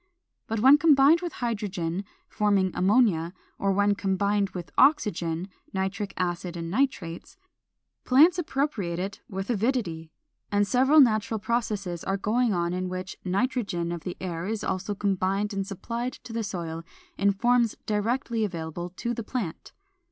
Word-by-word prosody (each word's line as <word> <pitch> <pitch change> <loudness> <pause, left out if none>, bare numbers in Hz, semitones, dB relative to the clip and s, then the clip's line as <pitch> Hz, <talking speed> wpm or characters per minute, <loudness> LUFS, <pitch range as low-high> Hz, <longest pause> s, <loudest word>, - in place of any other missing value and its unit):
But 220 -1 -2
when 270 +4 +7
combined 300 +1 +6
with 350 -2 -4
hydrogen 200 -5 -2 0.2
(forming 200 -3 +1
ammonia), 185 -4 +2 0.3
or 195 - +1
when 205 +1 +3
combined 200 +1 0
with 175 -4 -7
oxygen 185 - +2 0.3
(nitric 195 +1 -2
acid 175 -1 -2
and 165 0 -5
nitrates) 205 - -2 0.7
plants 315 +8 +5
appropriate 270 - -1
it 195 +2 -4
with 195 +3 -3
avidity. 205 -8 -1 0.4
And 205 0 +3
several 265 +6 +5
natural 220 -3 +2
processes 205 -6 -2
are 195 - -1
going 230 +4 +1
on 175 -2 0
in 185 0 -2
which 185 +1 -5
nitrogen 195 -4 -1
of 170 -1 -4
the 180 +1 -6
air 175 -1 -4
is 220 0 -2
so 190 +2 -2
combined 195 +1 0
and 195 -1 -2
supplied 235 +6 -4
to 240 - -11
the 225 0 -1
soil 170 -5 -5 0.3
in 200 0 +3
forms 240 +3 +2
directly 225 +2 0
available 175 -2 -4
to 235 - -2
the 235 - -4
plant. 210 -8 -5
200 Hz, 145 wpm, -27 LUFS, 180-235 Hz, 0.7 s, when